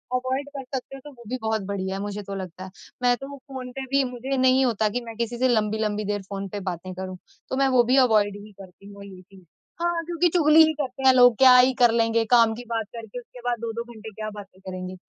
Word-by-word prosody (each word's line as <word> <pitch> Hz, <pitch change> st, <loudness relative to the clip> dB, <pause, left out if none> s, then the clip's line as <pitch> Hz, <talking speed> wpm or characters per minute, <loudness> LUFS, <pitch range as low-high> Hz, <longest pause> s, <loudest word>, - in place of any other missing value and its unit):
Avoid 260 Hz, +2 st, -2 dB
कर 270 Hz, -, -5 dB
सकते 265 Hz, +1 st, -6 dB
हो, -, -, -9 dB
तो 295 Hz, -, -11 dB
वो 240 Hz, -3 st, -16 dB
भी 255 Hz, +3 st, -3 dB
बहुत 220 Hz, -1 st, -1 dB
बढ़िया 190 Hz, -1 st, -3 dB
मुझे 205 Hz, +1 st, -4 dB
तो 200 Hz, 0 st, -7 dB
लगता 185 Hz, -1 st, -7 dB
है। 190 Hz, -, -9 dB, 0.3 s
मैं 245 Hz, 0 st, +4 dB
तो 275 Hz, +2 st, -9 dB
फ़ोन 260 Hz, -2 st, -9 dB
पे 270 Hz, -, -4 dB
भी 275 Hz, 0 st, +4 dB
मुझे 260 Hz, +2 st, -3 dB
नहीं 260 Hz, +1 st, +4 dB
होता 220 Hz, -3 st, +1 dB
कि 245 Hz, -, 0 dB
मैं 230 Hz, -1 st, -8 dB
किसी 235 Hz, 0 st, -3 dB
से 260 Hz, +2 st, +2 dB
लम्बी-लम्बी 215 Hz, -2 st, 0 dB
देर 205 Hz, 0 st, -2 dB
फ़ोन 195 Hz, -1 st, -5 dB
पे 205 Hz, -, -5 dB
बातें 180 Hz, +2 st, -8 dB
करूँ, 185 Hz, 0 st, -7 dB, 0.3 s
तो -, -, -2 dB
मैं 275 Hz, 0 st, +3 dB
वो 240 Hz, -, +6 dB
भी 250 Hz, +3 st, +2 dB
अवॉइड 205 Hz, -3 st, +2 dB
ही 210 Hz, -, -13 dB
करती 190 Hz, +1 st, -15 dB
हूँ 200 Hz, 0 st, -11 dB
ये 190 Hz, -2 st, -12 dB
चीज़। 190 Hz, 0 st, -19 dB, 0.4 s
हाँ 345 Hz, -1 st, 0 dB
क्योंकि 345 Hz, +1 st, +1 dB
चुगली 315 Hz, -2 st, +5 dB
ही 315 Hz, -, 0 dB
करते 270 Hz, -1 st, -4 dB
हैं 260 Hz, -, +8 dB
लोग, 245 Hz, -2 st, +6 dB
क्या 260 Hz, -1 st, +8 dB
ही 255 Hz, +1 st, +5 dB
कर 240 Hz, -1 st, +6 dB
लेंगे 230 Hz, 0 st, +2 dB
काम 230 Hz, -2 st, +5 dB
की 245 Hz, -, -8 dB
बात 225 Hz, -2 st, -2 dB
करके 230 Hz, +1 st, -8 dB
उसके 245 Hz, +1 st, -15 dB
बाद 240 Hz, -1 st, -2 dB
2-2 230 Hz, 0 st, -4 dB
घंटे 220 Hz, 0 st, -10 dB
क्या 215 Hz, +1 st, -5 dB
बातें 205 Hz, -3 st, -12 dB
करेंगे। 185 Hz, 0 st, -7 dB
230 Hz, 250 wpm, -24 LUFS, 205-260 Hz, 0.4 s, हैं